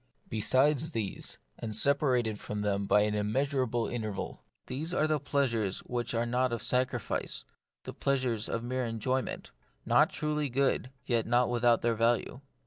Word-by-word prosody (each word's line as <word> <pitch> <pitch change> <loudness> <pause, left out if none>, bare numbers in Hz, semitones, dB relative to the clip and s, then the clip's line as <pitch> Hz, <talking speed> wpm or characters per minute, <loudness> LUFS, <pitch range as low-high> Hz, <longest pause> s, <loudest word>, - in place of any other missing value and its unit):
Besides 135 +7 +3
these, 105 -4 -2 0.2
and 110 -2 -2
separated 125 -4 +2
from 105 0 -4
them 100 -1 0
by 105 - +5
an 105 0 +1
immeasurable 120 +3 0
interval, 110 -4 -4 0.2
there 125 - -4 0.2
are 155 - +4
the 155 -1 +1
plea 140 +1 +1
sures 110 -6 -1
which 120 -1 -2
are 115 +1 +1
not 125 +1 +1
of 120 - -3
sacrifice, 125 -3 -1 0.4
the - - -7
pleasures 130 -5 0
of 115 - -2
mere 130 +1 -2
enjoyment: 120 - -2 0.3
not - - +5
truly 150 -1 -1
good, 135 0 +1 0.2
yet 115 -4 +1
not 120 +1 +3
without 120 -1 +3
their 120 0 +3
value. 115 +3 +1
120 Hz, 155 wpm, -30 LUFS, 110-130 Hz, 0.4 s, by